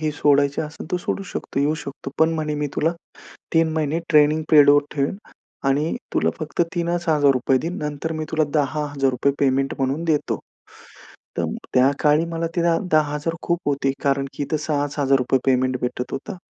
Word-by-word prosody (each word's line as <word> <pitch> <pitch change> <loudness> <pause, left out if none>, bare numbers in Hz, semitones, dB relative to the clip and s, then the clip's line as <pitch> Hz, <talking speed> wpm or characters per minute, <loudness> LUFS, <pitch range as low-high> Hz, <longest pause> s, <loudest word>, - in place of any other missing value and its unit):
ही 155 -1 0
सोडायची 140 -1 +2
असेल 155 +2 -7
तो - - +3
सोडू 195 +2 -3
शकतो 140 - -3
येऊ 150 +2 +2
शकतो. 140 -1 -7
पण 160 0 +4
म्हणे 155 -1 -2
मी 150 0 -1
तुला 165 +2 +2 0.6
3 165 -1 +3
महिने 155 0 0
ट्रेनिंग 150 0 +4
पिरियडवर 145 -1 +7
ठेवेन 140 +5 0 0.5
आणि 150 +4 +1 0.2
तुला - - +2
फक्त 155 +1 -4
3च 175 0 -1
हजार 145 -3 +4
रुपये 130 +1 +1
देईन 165 +6 -4
नंतर 150 +2 -3
मी 155 0 -3
तुला 160 -1 +2
₹10,000 145 -1 0
रुपये 135 +3 +1
पेमेंट 135 0 +1
म्हणून 135 +5 -1
देतो. 155 -3 0 1.0
तर - - +1 0.3
त्या 130 +2 +5
काळी 150 +2 +3
मला 165 0 -2
ते 175 - +1 0.3
₹10,000 150 +1 +1
खूप 170 0 0
होते 140 -1 +1
कारण 140 -1 +1
की 145 - -3
इथं 155 +2 -1
6च 145 -1 -2
हजार 135 -1 +4
रुपये 130 +1 +1
पेमेंट 130 -1 +2
भेटत 125 0 -3
होता. 185 +8 -5
150 Hz, 180 wpm, -22 LUFS, 140-160 Hz, 1.0 s, पिरियडवर